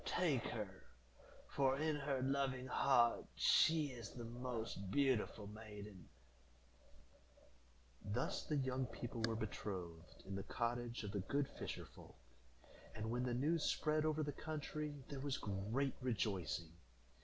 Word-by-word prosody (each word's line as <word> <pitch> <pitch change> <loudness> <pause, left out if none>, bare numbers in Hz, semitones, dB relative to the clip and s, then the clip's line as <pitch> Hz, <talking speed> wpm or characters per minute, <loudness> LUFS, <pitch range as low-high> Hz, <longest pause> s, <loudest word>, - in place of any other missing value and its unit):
Take 155 -9 +2
her, 105 -3 -2 0.8
for 135 -1 +3
in 155 +1 +2
her 140 -3 0
loving 135 -1 +1
heart 125 -2 +4
she 160 -3 +5
is 120 -2 -6
the 120 - -7
most 115 -5 -3
beautiful 125 -4 +2
maiden." 105 -4 -9 1.9
Thus 105 +5 -1
the 150 - -1
young 130 -2 +1
people 120 -1 -5
were 115 - 0
betrothed 90 -6 -5
in 95 - -5
the 100 - -1
cottage 120 +2 -1
of 105 - -3
the 100 - -1
good 140 +9 +1
fisher - - -5
folk, - - -14 0.8
and, 110 +1 -2
when 120 +1 +1
the 120 -1 +1
news 155 +6 +2
spread 155 0 +2
over 155 0 +2
the 145 - -1
country, 150 0 -3
there 140 - -4
was 140 0 0
great 110 +8 0
rejoicing. 95 -9 0
125 Hz, 135 wpm, -41 LUFS, 105-140 Hz, 1.9 s, she